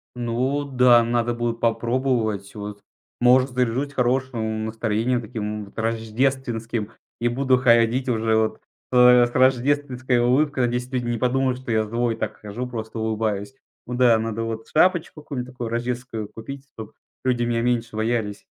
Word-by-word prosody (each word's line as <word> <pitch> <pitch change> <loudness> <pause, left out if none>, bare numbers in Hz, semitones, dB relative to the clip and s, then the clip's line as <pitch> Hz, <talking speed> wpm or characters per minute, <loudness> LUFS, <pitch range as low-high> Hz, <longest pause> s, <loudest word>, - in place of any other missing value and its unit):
Ну 125 +4 -1
да, 125 -3 +5
надо 120 0 0
будет 120 -1 -2
попробовать. 115 -3 0
Вот, 105 -1 -7 0.4
может, 130 +2 +5
заряжусь 125 +3 -1
хорошим 120 -4 -1
настроением 115 +2 -1
таким 105 -2 -5
вот 100 - -19
рождественским 115 -1 -1 0.3
и 120 - +1
буду 130 +1 +2
ходить 120 +1 +3
уже 110 -1 +1
вот, 110 0 0 0.3
э, 125 -1 +7
с 120 - -5
рождественской 130 0 +2
улыбкой. 130 +2 +2
Надеюсь, 125 +1 -2
люди 125 -2 -1
не 120 -1 -1
подумают, 130 +1 +1
что 130 -3 -6
я 110 -1 +2
злой 115 +2 0
и 115 - -9
так - - -4
хожу, 110 +5 -5
просто 110 -1 -6
улыбаюсь. 110 +2 -2 0.3
Ну 125 - -4
да, 120 -3 +5
надо 115 0 -3
вот 115 0 -5
шапочку 170 -2 +2
какую-нибудь 130 -4 -5
такую 120 -2 -5
рождественскую 120 -2 -3
купить, 135 +5 -9
чтоб 110 -2 -9 0.3
люди 125 -2 +1
меня 120 -1 0
меньше 120 -2 -1
боялись. 110 -2 -2
120 Hz, 155 wpm, -23 LUFS, 110-130 Hz, 0.4 s, э